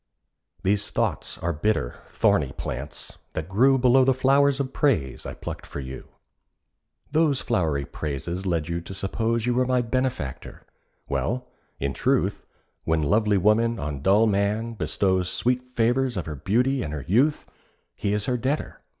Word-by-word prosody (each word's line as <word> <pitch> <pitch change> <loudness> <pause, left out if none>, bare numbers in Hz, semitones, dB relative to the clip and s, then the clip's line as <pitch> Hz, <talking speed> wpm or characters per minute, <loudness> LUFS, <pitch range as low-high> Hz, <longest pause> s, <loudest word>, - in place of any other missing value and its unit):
These 100 +2 +1
thoughts - - -1
are 85 +1 -2
bitter—thorny 75 - 0
plants, 70 +4 -6
that 80 0 -4
grew 130 +8 +4
Below 130 +1 +5
the 130 0 +3
flowers 140 +1 +3
of 135 -1 -2
praise 95 - 0
I - - -6
plucked - - -7
for - - -6
you. 65 -1 -7 1.0
Those 150 -3 +2
flowery 80 - 0
praises 80 +8 -4
led 85 -3 0
you 85 0 -2
to 95 - -8
suppose 115 +4 -1
You 125 - +2
were 125 +1 +2
my 125 -1 +2
benefactor. 120 - -3 0.4
Well, 125 +1 -2 0.3
in 70 0 -1
truth, - - +1 0.4
When 80 -1 +1
lovely 105 +5 +3
woman 110 +4 +3
on 70 -2 -4
dull 100 +7 +4
man 105 +2 0
bestows 95 -4 0
Sweet 125 +4 0
favours 125 0 0
of 90 - -2
her 75 - -5
beauty 125 - +1
and 75 - -4
her 70 - -6
youth, 130 - +2 0.5
He 100 - -2
is 105 0 0
her 125 - 0
debtor. 135 +5 -2
105 Hz, 155 wpm, -25 LUFS, 85-125 Hz, 1.0 s, Below